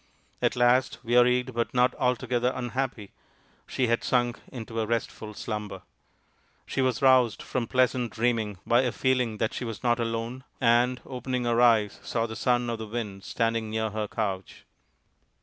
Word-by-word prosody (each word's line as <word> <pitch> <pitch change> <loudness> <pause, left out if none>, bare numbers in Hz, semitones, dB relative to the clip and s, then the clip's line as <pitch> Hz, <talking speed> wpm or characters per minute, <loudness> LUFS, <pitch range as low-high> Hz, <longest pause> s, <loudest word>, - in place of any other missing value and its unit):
At - - +1
last, 125 +1 +3
wearied 125 +1 +3
but 120 +2 -2
not 125 +1 +4
altogether 125 -1 0
un 125 -1 -3
happy, 120 -5 -3 0.6
she 130 - 0
had 115 0 +1
sunk 120 -2 +1
into 115 -2 -6
a 110 - -1
restful 110 -2 -3
slumber. 105 -4 -5 0.8
She 135 - -2
was 130 0 0
roused 130 -4 +4
from 125 -3 -2
pleasant 125 -1 +1
dreaming 115 -4 0
by 120 +1 +4
a 125 -2 0
feeling 125 -4 0
that 110 +1 -1
she - - -4
was 115 -2 -6
not 120 -1 +2
alone, 115 +2 -3 0.2
and, 120 +1 +3
opening 125 -1 -3
her 120 0 +2
eyes, 110 -4 +4
saw 115 -1 -1
the 110 -1 -6
Son 120 +2 +1
of 115 - -4
the 110 - -5
Wind 105 -4 -5
standing 115 -1 -1
near 110 0 -1
her 105 0 -2
couch. 100 -4 -4
120 Hz, 165 wpm, -27 LUFS, 110-125 Hz, 0.8 s, not